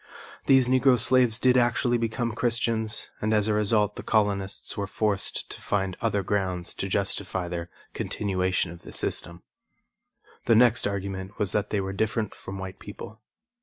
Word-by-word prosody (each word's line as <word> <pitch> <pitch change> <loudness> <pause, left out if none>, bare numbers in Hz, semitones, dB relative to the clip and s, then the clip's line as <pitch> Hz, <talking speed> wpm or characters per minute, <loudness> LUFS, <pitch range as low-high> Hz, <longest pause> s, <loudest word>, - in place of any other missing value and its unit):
These 135 -2 +6
Negro 130 0 +4
slaves 120 -1 +3
did 125 0 +4
actually 120 0 +2
become 115 +1 -1
Christians 115 -1 -1
and 110 +1 +2
as 105 0 +3
a 110 - +2
result 105 0 +2
the - - -4
colonists 100 -3 0
were 100 -1 -2
forced 105 -2 0
to - - -8
find 95 -2 -1
other 105 -4 +1
grounds 95 -3 -1
to 95 - -3
justify 95 -2 -1
their 85 0 -4 0.2
continuation 95 -4 -1
of 85 - -11
the - - -11
system. 85 +1 -4 1.0
The 115 - +5
next 120 -1 +4
argument 100 -1 -4
was 100 -3 0
that 105 0 0
they 105 - 0
were 95 0 -4
different 110 +1 -1
from 95 - -8
white 95 0 -7
people. 110 +1 -10
105 Hz, 165 wpm, -26 LUFS, 95-115 Hz, 1.0 s, These